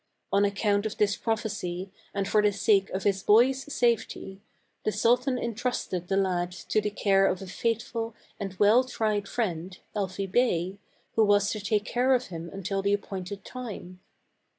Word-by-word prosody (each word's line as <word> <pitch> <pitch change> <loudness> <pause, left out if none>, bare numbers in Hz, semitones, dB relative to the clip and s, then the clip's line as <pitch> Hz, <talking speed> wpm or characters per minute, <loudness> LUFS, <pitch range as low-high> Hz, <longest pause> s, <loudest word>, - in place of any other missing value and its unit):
On 200 +1 +4
account 205 +1 +1
of 215 - -7
this 205 -1 +2
prophecy, 195 -5 -3 0.2
and 195 -1 -2
for 210 +1 +4
the 210 0 +3
sake 200 -1 +2
of 190 - -3
his 195 -1 +1
boy's 260 +6 +4
safety, 225 -5 0 0.4
the 215 - +1
sultan 250 +5 +2
intrusted 230 -7 -2
the 195 - +1
lad 180 -2 +1 0.2
to 215 - +3
the 210 - -1
care 195 -1 +3
of 185 -1 0
a 195 - -7
faithful 225 +3 -2 0.2
and 195 -2 -4
well 215 +5 +6
tried 215 -5 -1
friend, 180 -5 -3 0.2
Elfi 195 -1 -2
Bey, 195 -3 +1 0.4
who 225 - +5
was 205 -1 +3
to 215 - -3
take 210 +1 0
care 255 +2 +3
of 250 0 -2
him 170 -1 -6
until 195 0 -2
the 200 +1 +1
appointed 195 -1 -4
time. 210 -7 -7
205 Hz, 170 wpm, -28 LUFS, 195-225 Hz, 0.4 s, well